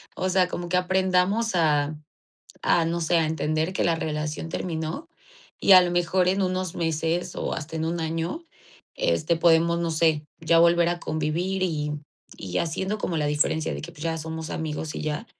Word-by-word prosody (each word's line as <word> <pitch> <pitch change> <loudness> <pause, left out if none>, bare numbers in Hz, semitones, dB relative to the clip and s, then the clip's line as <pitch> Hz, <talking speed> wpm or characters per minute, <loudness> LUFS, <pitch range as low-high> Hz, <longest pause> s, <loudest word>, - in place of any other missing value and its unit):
O 185 - -1
sea, 185 -1 +3
como 175 -1 -5
que 180 - +2
aprendamos 190 +4 +1
a 150 -3 +2 0.7
a, 165 -1 +3
no 170 +1 -1
sé, 170 +1 +2
a 165 - +3
entender 155 +2 -1
que - - 0
la 165 -1 +2
relación 155 0 -3
terminó 165 - -4 0.5
y 195 - +3
a 185 - +10
lo 180 - 0
mejor 175 +1 +1
en 190 +2 +2
unos 185 -1 -2
meses 165 +2 -1
o - - -2
hasta 160 0 -6
en 160 - -1
1 170 +1 -2
año, 165 - -3 0.5
este, 170 - +1
podemos, 170 0 +4
no 170 -1 -1
sé, 155 -2 +2
ya 165 0 +3
volver 170 0 +5
a 175 0 -2
convivir 170 +5 -1
y 150 -4 -1 0.5
y 90 -2 -3
haciendo 190 +5 -2
como 170 - -2
la 150 - 0
diferencia 150 +1 0
de - - -5
que 170 - -8
pues 155 -2 -10
ya 165 -1 -1
somos 160 0 -5
amigos 155 -1 -4
y - - -4
ya, 155 +6 -3
165 Hz, 190 wpm, -25 LUFS, 160-180 Hz, 0.7 s, a